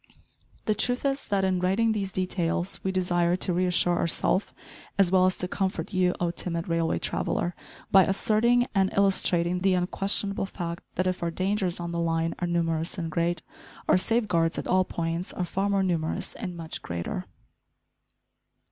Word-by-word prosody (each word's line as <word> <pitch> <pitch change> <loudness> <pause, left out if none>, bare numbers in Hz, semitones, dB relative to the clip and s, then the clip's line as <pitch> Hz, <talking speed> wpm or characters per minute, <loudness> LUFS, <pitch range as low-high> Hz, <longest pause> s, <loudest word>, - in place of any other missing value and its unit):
The 215 - +2
truth 245 +5 0
is, 275 0 0
that 200 -2 +1
in 190 -1 +1
writing 195 +5 +2
these 200 -3 -2
details 180 -1 -1
we 190 - 0
desire 175 -2 +1
to 185 0 +1
reassure 175 -1 +2
ourself, 185 +3 +1 0.5
as 195 -3 +4
well 185 -1 +5
as 185 - 0
to 180 - -2
comfort 190 +2 -2
you, 180 -1 +2
O 175 -1 0
timid 170 -1 -4
railway 165 -1 +1
traveller, 175 - -1 0.4
by 190 -1 +7
asserting 230 +5 +3
and 190 -2 +2
illustrating 180 -3 +2
the 190 0 +3
unquestionable 195 +2 -1
fact, 170 -3 -5
that 185 - 0
if 185 0 -1
our 170 - 0
dangers 185 +1 -1
on 170 0 -4
the 170 - -2
line 165 0 0
are 175 - -1
numerous 165 0 0
and 165 -3 -3
great, 170 +1 0 0.4
our - - +5
safeguards 185 -7 +1
at - - -3
all 185 0 +3
points 170 +1 -3
are 180 - -2
far 195 +3 -1
more 200 -1 +2
numerous 165 -4 -1
and 180 -6 -6
much 165 -1 -5
greater. 85 0 -4
180 Hz, 170 wpm, -27 LUFS, 170-195 Hz, 0.5 s, by